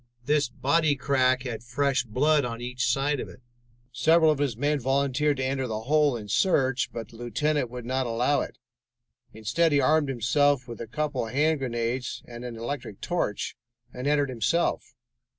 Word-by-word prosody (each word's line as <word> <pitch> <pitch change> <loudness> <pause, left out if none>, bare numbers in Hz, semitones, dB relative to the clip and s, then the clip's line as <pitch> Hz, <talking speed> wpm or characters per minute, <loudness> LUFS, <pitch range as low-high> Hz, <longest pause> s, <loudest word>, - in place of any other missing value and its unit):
This 145 -2 +2
bodycrack 140 -3 +2
had 120 -4 -5
fresh 130 +1 0
blood 145 +6 +2
on 115 -1 -4
each 125 0 -1
side 140 +2 0
of - - -5
it. - - -14 0.5
Several 160 +6 +4
of 150 - -1
his 135 -6 -1
men 145 +3 +1
volunteered 140 +2 +1
to 130 - -1
enter 130 0 -1
the 110 -1 -3
hole 145 +1 +2
and 105 -2 -8
search, 135 -8 +2
but 115 -3 -6
the 115 - -14
lieutenant 145 +3 -1
would 125 -1 -7
not 130 +1 -1
allow 120 +5 +1
it. - - -6 0.7
Instead, 120 +10 +1
he 145 - +4
armed 155 -1 +3
himself 135 +2 +2
with 120 -1 -8
a 115 - -5
couple 145 -1 -2
of 110 - -9
hand 155 +1 +2
grenades 120 0 -3
and 120 0 -9
an 120 -2 -6
electric 120 -3 -5
torch 170 - -2 0.4
and 125 +2 -4
entered 145 -1 +2
himself. 130 +3 -1
130 Hz, 175 wpm, -26 LUFS, 120-145 Hz, 0.7 s, Several